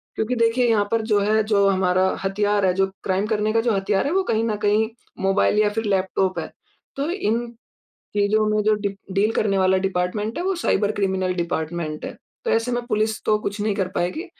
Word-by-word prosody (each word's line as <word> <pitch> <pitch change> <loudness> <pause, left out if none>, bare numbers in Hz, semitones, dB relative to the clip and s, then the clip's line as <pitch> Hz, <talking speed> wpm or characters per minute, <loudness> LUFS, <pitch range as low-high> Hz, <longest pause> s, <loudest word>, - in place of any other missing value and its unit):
क्योंकि 230 +3 -1
देखिए 230 +1 +2
यहाँ 210 -2 +3
पर 230 0 +2
जो 205 - +4
है 215 +2 +2
जो 205 -2 +3
हमारा 185 0 +2 0.2
हथियार 205 +1 +1
है, 185 - +3
जो 195 +1 +2 0.2
क्राइम 190 +1 0
करने 215 0 0
का 225 - +3
जो 235 0 +1
हथियार 195 0 0
है - - -1
वो 385 0 +2
कहीं 225 0 +1
न 225 -2 0
कहीं 215 +2 +2 0.3
मोबाइल 195 +2 +2
या 210 -1 +4
फिर 225 0 -2
लैपटॉप 190 -1 0
है। - - -6 0.4
तो 280 +4 -2
इन 240 - -1 0.7
चीजों 210 +1 +2
में 215 0 +1
जो 215 0 +4
डी 205 -1 -2 0.3
डील 210 +3 +2
करने 195 -2 +1
वाला 190 0 +3
डिपार्टमेंट 195 +3 -2
है - - -1
वो 385 - +1
साइबर 215 - +1
क्रिमिनल 190 -2 -1
डिपार्टमेंट 165 -2 -3
है। - - -5 0.3
तो - - 0
ऐसे 230 +2 +1
में 240 0 -1
पुलिस 215 -1 -1
तो 215 -1 +2
कुछ 205 0 -4
नहीं 210 -1 0
कर 190 -3 -1
पाएगी, 180 - -1
210 Hz, 215 wpm, -22 LUFS, 190-220 Hz, 0.7 s, जो